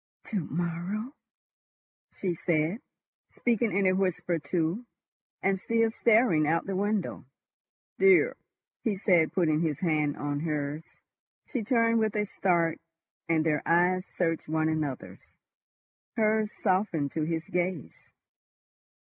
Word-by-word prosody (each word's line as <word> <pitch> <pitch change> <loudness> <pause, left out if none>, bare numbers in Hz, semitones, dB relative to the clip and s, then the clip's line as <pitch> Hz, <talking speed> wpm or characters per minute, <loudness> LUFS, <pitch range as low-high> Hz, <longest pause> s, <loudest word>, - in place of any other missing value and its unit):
"To 210 - 0
morrow," 175 - -3 1.0
she 185 -3 -2
said, 165 +4 0 0.5
speaking 235 -2 +1
in 195 +1 +1
a 185 - +4
whisper 185 -2 0
too, 165 +9 -2 0.6
and 195 0 +1
still 230 +3 +1
staring 220 -10 +3
out 165 +2 +2
of - - -24
the 195 - -1
window. 205 0 -1 0.8
"Dear!" 390 -2 +5 0.5
he 210 -4 0
said, 175 -5 +3
putting 160 -5 +2
his 155 -4 -1
hand 155 -4 +1
on 145 0 -2
hers. 150 -1 -2 0.6
She 250 - -3
turned 230 0 +3
with 220 -1 0
a 210 0 +1
start, 170 -5 +1 0.5
and 160 -1 +2
their 150 -2 +1
eyes 180 +2 +2
searched 165 -2 -2
one 160 0 +1
another's. 150 -5 -3 1.0
Hers 215 -1 +2
softened 185 -7 0
to 160 - -2
his 160 +1 -2
gaze. 180 -5 -3
175 Hz, 125 wpm, -28 LUFS, 160-210 Hz, 1.0 s, Dear